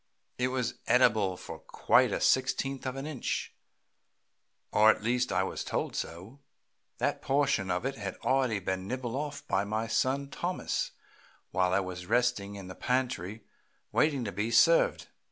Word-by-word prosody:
It 125 - +2
was 130 -2 -2
edible 110 -7 +3
for - - -8
quite - - +3
a - - -1
sixteenth 135 +1 +1
of 130 - -3
an 135 +1 -5
inch, 150 -4 -3 1.2
or 110 +1 +6
at 110 - +2
least 125 +2 +1
I - - +2
was - - -4
told - - -2
so. 95 +11 -6 0.6
That - - -1
portion 135 -8 +1
of 90 +7 -1
it 135 0 -2
had 100 -3 -5
already 130 -5 +2
been 95 0 -3
nibbled 125 0 -3
off 145 +1 -4
by 95 0 +1
my 110 +2 -2
son 130 +5 0
Thomas 175 +5 -2 0.6
while 90 -1 +2
it 100 -1 +1
was 90 -1 -7
resting 120 -4 +1
in 100 -2 -8
the 95 - -7
pantry 120 -4 -2 0.5
waiting 145 -5 +2
to 100 - -3
be 105 +4 -2
served. 120 +9 +4
120 Hz, 160 wpm, -30 LUFS, 100-130 Hz, 1.2 s, or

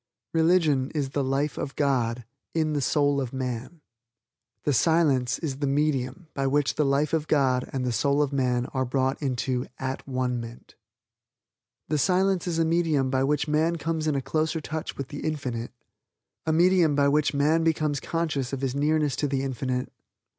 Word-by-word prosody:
Religion 160 -5 +3
is 140 -3 -1
the 140 0 0
life 135 +3 -1
of 135 - -4
God 125 -4 0 0.3
in 155 -2 +1
the 145 - 0
soul 145 0 +2
of 125 -3 -4
Man. 130 +4 -4 0.8
The 145 - +1
Silence 135 -3 +2
is 145 -6 -4
the 145 - 0
medium 140 +2 0
by 135 -1 -1
which 145 +1 +1
the 155 - +1
life 140 +2 +1
of 155 -1 0
God 130 -4 +2
and 130 -2 -2
the 125 - 0
soul 140 +5 +2
of 145 -1 -3
man 125 -2 +1
are 130 -1 +1
brought 130 +2 0
into 130 -2 -1
At 130 +1 -4
one 130 -2 -1
ment. 115 +1 -11 1.1
The 155 0 0
Silence 190 +2 +2
is 170 -2 -1
a 165 - +3
medium 160 -5 +1
by 130 0 +2
which 145 +2 +1
man 155 +3 +2
comes 160 -1 -2
in 150 - +1
a 135 - -1
closer 160 +2 0
touch 155 +1 -5
with 135 -2 -5
the 145 -1 -6
Infinite; 130 -7 -3 0.8
a - - +3
medium 170 -2 +4
by 140 0 +3
which 145 +1 +2
man 155 +4 +3
becomes 155 -3 +1
conscious 155 -6 -2
of 135 -1 -4
his 135 -2 -1
nearness 150 -1 +1
to 145 - 0
the 135 -1 -1
Infinite. 130 -1 -3
140 Hz, 180 wpm, -26 LUFS, 130-155 Hz, 1.1 s, medium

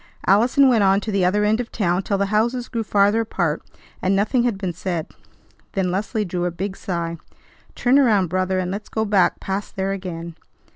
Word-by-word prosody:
Allison 240 +7 +4
went 235 -5 +4
on 195 0 +4
to 215 - -4
the 195 -2 +1
other 200 +4 +2
end 215 +2 +2
of 245 - -4
town 180 -3 0
till 200 0 -1
the 200 - +1
houses 235 +3 +1
grew 230 - -2
farther 205 +1 +3
apart, 175 -8 -1 0.4
and 190 +1 +2
nothing 215 +5 +2
had 235 -4 0
been 190 -3 -3
said. 175 -2 -3 0.7
Then 185 -2 0
Leslie 210 +3 -1
drew 175 -1 -2
a - - +1
big 190 +3 -4
sigh. 170 -3 -4 0.6
"Turn 255 +3 +3
around, 215 -8 +4
brother, 185 +2 -1
and 185 -1 -1
let's 205 +2 -6
go 220 0 -1
back 200 -3 +2
past 195 +1 -4
there 195 0 -1
again." 170 -4 -6
195 Hz, 200 wpm, -22 LUFS, 185-215 Hz, 0.7 s, Allison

